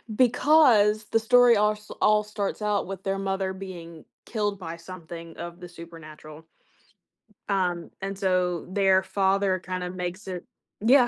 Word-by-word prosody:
because 240 Hz, -4 st, +4 dB
the 225 Hz, -, +4 dB
story 245 Hz, +1 st, +5 dB
all 210 Hz, 0 st, +3 dB
s 210 Hz, 0 st, -14 dB
all 210 Hz, 0 st, +4 dB
starts 210 Hz, 0 st, -4 dB
out 210 Hz, -3 st, 0 dB
with 190 Hz, -1 st, -7 dB
their 195 Hz, 0 st, -1 dB
mother 195 Hz, -1 st, -2 dB
being 170 Hz, -4 st, -9 dB, 0.2 s
killed 210 Hz, -3 st, -2 dB
by 170 Hz, -3 st, -6 dB
something 170 Hz, -1 st, -10 dB
of 170 Hz, +1 st, -7 dB
the 180 Hz, -1 st, -10 dB
supernatural 160 Hz, -2 st, -12 dB, 1.1 s
um, 180 Hz, -4 st, 0 dB
and 195 Hz, 0 st, -4 dB
so, 180 Hz, -3 st, 0 dB
their 190 Hz, -1 st, +3 dB
father 195 Hz, 0 st, +1 dB
kinda 185 Hz, 0 st, -4 dB
makes 180 Hz, +2 st, -5 dB
it 180 Hz, -2 st, -6 dB, 0.3 s
Yeah. 245 Hz, +3 st, +5 dB
190 Hz, 145 wpm, -26 LUFS, 175-210 Hz, 1.1 s, story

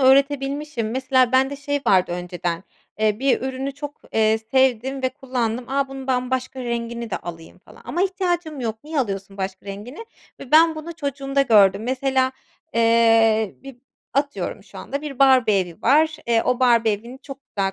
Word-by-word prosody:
öğretebilmişim. 275 Hz, -2 st, +2 dB
Mesela 260 Hz, 0 st, +2 dB
bende 265 Hz, +2 st, +2 dB
şey 285 Hz, 0 st, -2 dB
vardı 185 Hz, -4 st, +3 dB
önceden, 175 Hz, -1 st, -4 dB, 0.4 s
eee, 215 Hz, -1 st, +1 dB
bir 270 Hz, 0 st, +2 dB
ürünü 265 Hz, +1 st, -3 dB
çok, 290 Hz, 0 st, -8 dB
eee, 220 Hz, 0 st, +3 dB
sevdim 265 Hz, 0 st, +2 dB
ve 260 Hz, -, +2 dB
kullandım. 250 Hz, -3 st, -3 dB
A, 275 Hz, 0 st, 0 dB
bunun 270 Hz, -1 st, -8 dB
ben 255 Hz, -1 st, 0 dB
başka 260 Hz, 0 st, -2 dB
rengini 235 Hz, -1 st, -4 dB
de -, -, -1 dB
alayım 165 Hz, -1 st, -9 dB
falan -, -, -18 dB
ama 350 Hz, -, -1 dB
ihtiyacım 350 Hz, -6 st, -1 dB
yok 225 Hz, +1 st, -4 dB
niye 310 Hz, -1 st, -3 dB
alıyorsun 195 Hz, -4 st, -4 dB
başka 190 Hz, 0 st, -5 dB
rengini 215 Hz, -, -8 dB, 0.4 s
ve 255 Hz, -, -10 dB
ben 325 Hz, +1 st, +6 dB
bunu 315 Hz, +2 st, -7 dB
çocuğumda 275 Hz, -2 st, -1 dB
gördüm. 205 Hz, -4 st, +5 dB
Mesela, 260 Hz, 0 st, +1 dB, 0.4 s
eee, 225 Hz, -2 st, +4 dB
bir 270 Hz, -2 st, -10 dB, 0.4 s
atıyorum 280 Hz, +1 st, -2 dB
şu -, -, -13 dB
anda 280 Hz, +1 st, -5 dB
bir 280 Hz, -3 st, -7 dB
Barbie 255 Hz, -7 st, +5 dB
evi 175 Hz, -3 st, -7 dB
var, 310 Hz, +5 st, +4 dB
eee, 230 Hz, -1 st, +3 dB
o 250 Hz, 0 st, 0 dB
Barbie 235 Hz, -3 st, +4 dB
evini 235 Hz, +6 st, -7 dB
çok 275 Hz, -1 st, -9 dB
güzel 195 Hz, -1 st, -2 dB
255 Hz, 170 wpm, -22 LUFS, 220-275 Hz, 0.4 s, ben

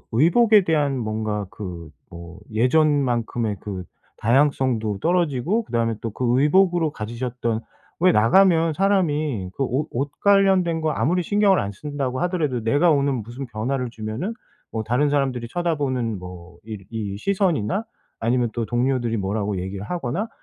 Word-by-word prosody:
의복에 205 Hz, -, +5 dB
대한 145 Hz, -5 st, +1 dB
뭔가 110 Hz, -2 st, -2 dB
그 85 Hz, -6 st, -8 dB, 0.2 s
뭐 85 Hz, +1 st, -11 dB
예전 145 Hz, +6 st, +3 dB
만큼의 120 Hz, -4 st, -1 dB
그 95 Hz, -3 st, -6 dB, 0.4 s
다양성도 120 Hz, -4 st, +1 dB
떨어지고 175 Hz, -, +1 dB
그 -, -, -17 dB
다음에 115 Hz, -1 st, +1 dB
또 115 Hz, -, -4 dB
그 125 Hz, +1 st, +1 dB
의복으로 170 Hz, 0 st, +3 dB
가지셨던 115 Hz, +1 st, -3 dB, 0.4 s
왜 180 Hz, +1 st, +4 dB
나가면 165 Hz, -, +4 dB
사람이 155 Hz, -, 0 dB
그 135 Hz, -, 0 dB
옷 135 Hz, +5 st, -1 dB
옷 140 Hz, +4 st, -3 dB
관련된 190 Hz, -5 st, +3 dB
거 155 Hz, -1 st, 0 dB
아무리 175 Hz, +5 st, 0 dB
신경을 205 Hz, -1 st, +3 dB
안 100 Hz, -, -2 dB
쓴다고 135 Hz, +2 st, -4 dB
하더라도 155 Hz, -10 st, -1 dB
내가 145 Hz, +9 st, +3 dB
오늘 140 Hz, -1 st, +1 dB
무슨 120 Hz, +3 st, -6 dB
변화를 125 Hz, +3 st, -2 dB
주면은 115 Hz, -, -4 dB, 0.4 s
뭐 110 Hz, -1 st, -3 dB
다른 125 Hz, +6 st, +1 dB
사람들이 130 Hz, -5 st, -1 dB
쳐다보는 135 Hz, -, -1 dB
뭐 90 Hz, -1 st, -11 dB
이 110 Hz, -1 st, -6 dB
이 105 Hz, -4 st, -4 dB
시선이나 190 Hz, -, 0 dB, 0.4 s
아니면 120 Hz, +1 st, +1 dB
또 120 Hz, -, -1 dB
동료들이 120 Hz, 0 st, 0 dB
뭐라고 100 Hz, 0 st, -2 dB
얘기를 95 Hz, +2 st, -5 dB
하거나 170 Hz, -, -3 dB
130 Hz, 330 characters per minute, -23 LUFS, 110-160 Hz, 0.4 s, 의복에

